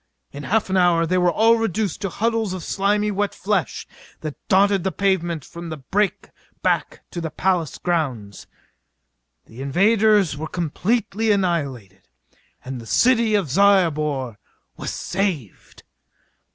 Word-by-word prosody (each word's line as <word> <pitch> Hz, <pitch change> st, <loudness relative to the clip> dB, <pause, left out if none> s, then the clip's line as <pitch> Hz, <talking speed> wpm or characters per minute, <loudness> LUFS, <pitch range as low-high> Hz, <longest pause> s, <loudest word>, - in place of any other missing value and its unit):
In 140 Hz, -, -8 dB
half 210 Hz, +8 st, 0 dB
an 190 Hz, -, +2 dB
hour 175 Hz, -2 st, +3 dB
they 185 Hz, +2 st, +1 dB
were 180 Hz, -1 st, +3 dB
all 225 Hz, +5 st, +4 dB
reduced 215 Hz, -4 st, -2 dB
to 195 Hz, -, -2 dB
huddles 225 Hz, 0 st, -1 dB
of 185 Hz, -3 st, -6 dB
slimy 205 Hz, +1 st, 0 dB
wet 205 Hz, 0 st, -1 dB
flesh 195 Hz, -3 st, -1 dB, 0.4 s
that 155 Hz, -2 st, -4 dB
dotted 195 Hz, -1 st, +3 dB
the 190 Hz, -, 0 dB
pavement 175 Hz, -6 st, 0 dB
from 170 Hz, -1 st, -9 dB
the 155 Hz, -, -5 dB
break 195 Hz, +9 st, -1 dB, 0.3 s
back -, -, 0 dB
to 170 Hz, -, -5 dB
the 165 Hz, -, -3 dB
palace 175 Hz, 0 st, -1 dB
grounds. 130 Hz, -, -3 dB, 1.0 s
The 115 Hz, +4 st, -11 dB
invaders 200 Hz, +5 st, +3 dB
were 155 Hz, +2 st, -5 dB
completely 210 Hz, +6 st, -1 dB
annihilated 140 Hz, -, -2 dB, 0.6 s
and 130 Hz, -2 st, -6 dB
the 115 Hz, -, -12 dB
city 230 Hz, -, +3 dB
of 185 Hz, -10 st, 0 dB
Zyobor 155 Hz, -, +2 dB, 0.4 s
was -, -, -5 dB
saved! 175 Hz, -, -4 dB
180 Hz, 140 wpm, -22 LUFS, 155-205 Hz, 1.0 s, all